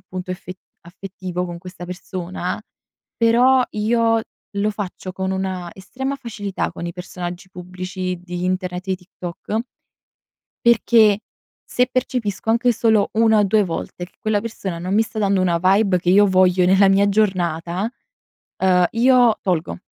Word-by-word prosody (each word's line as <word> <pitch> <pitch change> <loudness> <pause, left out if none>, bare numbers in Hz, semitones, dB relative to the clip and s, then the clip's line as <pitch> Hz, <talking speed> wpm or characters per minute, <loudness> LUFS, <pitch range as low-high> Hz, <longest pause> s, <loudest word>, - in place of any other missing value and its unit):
appunto 185 0 -7
effe 185 0 -6 0.3
affettivo 180 0 -6
con 170 0 -7
questa 180 0 -9
persona, 180 +1 -5 0.6
però 245 +3 +4
io 225 +1 +2 0.4
lo 210 +1 +1
faccio 190 -2 -6
con 190 0 -3
una 185 -2 -3
estrema 265 +8 -4
facilità 205 -6 -4
con - - -7
i 170 - -4
personaggi 180 +1 -7
pubblici 185 0 -5
di 180 0 -5
internet 185 0 -2
e 190 - +1
TikTok 180 +3 -5 1.0
perché 225 -3 +5 0.5
se 250 0 +1
percepisco 230 -5 -2
anche 235 +1 +3
solo 220 -2 +2
1 220 -1 +4
o 210 - +4
2 210 +2 +3
volte 175 0 -5
che 180 - -23
quella 215 -1 0
persona 195 -6 -5
non 185 +3 -3
mi 220 - +4
sta 220 -1 -6
dando 195 -2 +2
una 170 -2 +1
vibe 190 0 +3
che 175 - -1
io 205 +2 +6
voglio 185 -1 +4
nella 195 +2 +5
mia 200 +1 +4
giornata, 185 -2 0 0.7
ehm 180 -1 +4
io 245 -1 +4
tolgo, 175 -3 -1
190 Hz, 150 wpm, -21 LUFS, 180-215 Hz, 1.0 s, io